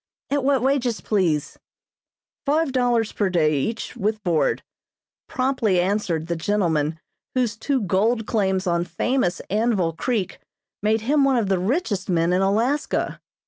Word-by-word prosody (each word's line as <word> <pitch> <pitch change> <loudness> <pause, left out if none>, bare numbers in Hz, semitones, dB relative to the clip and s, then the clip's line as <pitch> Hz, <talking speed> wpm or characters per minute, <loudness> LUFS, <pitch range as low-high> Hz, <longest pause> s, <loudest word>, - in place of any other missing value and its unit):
"At 285 -1 +1
what 270 -2 +2
wages, 260 -4 +1
please?" 170 -8 0 0.8
"Five 305 +1 +1
dollars 245 -4 +1
per 200 -3 0
day, 160 -4 +2
each, 225 +11 -3
with 215 +1 -2
board," 170 -5 +1 0.6
promptly 255 -8 +1
answered 180 -4 0
the 170 0 -2
gentleman 165 -4 0 0.4
whose 245 -5 +1
two 260 +4 -1
gold 215 +4 +1
claims 190 -4 0
on 170 -1 +1
famous 180 +2 -1
Anvil 205 -6 +1
Creek 210 +1 -2 0.4
made 215 +1 +1
him 280 +5 +2
one 270 -2 +3
of 215 -5 0
the 190 -2 +2
richest 205 - -1
men 170 0 +2
in 185 - +2
Alaska. 235 +10 0
210 Hz, 140 wpm, -23 LUFS, 180-250 Hz, 0.8 s, one